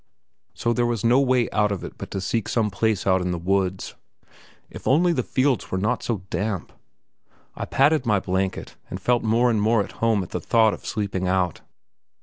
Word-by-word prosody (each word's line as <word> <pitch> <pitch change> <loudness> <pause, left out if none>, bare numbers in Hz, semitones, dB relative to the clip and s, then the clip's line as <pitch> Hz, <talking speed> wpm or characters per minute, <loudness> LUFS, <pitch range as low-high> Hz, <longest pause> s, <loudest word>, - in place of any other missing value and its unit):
So 120 - 0
there 120 0 +1
was 120 -3 -2
no 120 +3 +4
way 130 -3 +2
out 105 -1 +2
of 100 - -4
it - - -7
but - - -8
to 95 - -4
seek 115 +2 -2
some 110 -3 0
place 110 0 0
out 95 -1 +3
in 90 - -2
the 90 - -1
woods. 95 +1 -1 0.7
If - - -9
only 170 +6 +4
the - - 0
fields 130 -4 0
were 95 - -2
not 100 +3 0
so 110 -6 -3
damp. 95 0 -3 0.8
I - - -4
patted 145 +1 +3
my 105 -3 +3
blanket, 95 +1 -3
and 90 - -5
felt 120 +5 +1
more 115 +2 +2
and 110 -2 +1
more 110 0 +3
at - - -10
home 110 -4 +2
at 90 - -11
the 90 - -3
thought 110 +3 +3
of - - -9
sleeping 100 -3 -2
out. 90 -2 0
105 Hz, 205 wpm, -23 LUFS, 95-120 Hz, 0.8 s, no